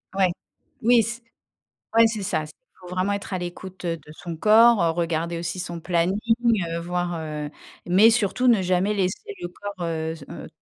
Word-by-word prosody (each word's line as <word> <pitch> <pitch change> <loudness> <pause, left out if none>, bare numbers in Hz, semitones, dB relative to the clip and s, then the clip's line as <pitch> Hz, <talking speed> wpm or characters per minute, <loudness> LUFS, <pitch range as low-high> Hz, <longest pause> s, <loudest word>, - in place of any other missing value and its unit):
Ouais, 190 -2 +3 0.5
oui, 235 0 +5
c 235 +2 -5 0.8
ouais, 230 0 +8
c'est 220 -2 -2
ça. 155 -4 -1
Il 150 - -10 0.3
faut 180 - -12
vraiment 185 +2 0
être 200 0 -5
à 185 - 0
l'écoute, 180 +1 -8
heu, 170 -1 -1
de 150 -1 -14
son 170 +1 -7
corps, 215 -3 +5
regarder 170 0 -1
aussi 170 +2 -4
son 175 -1 -5
planning, 175 +2 +1 0.7
voir, 175 0 -2
heu, 150 -1 -5 0.4
mais 195 +6 +6
surtout 230 +2 +1
ne 230 -6 +5
jamais 185 +3 +1
laisser 205 - -2
le 175 - -4
corps, 205 +3 -8
heu, 160 -1 -2
se, 165 - -12
heu - - -8
180 Hz, 180 wpm, -24 LUFS, 170-205 Hz, 0.8 s, ouais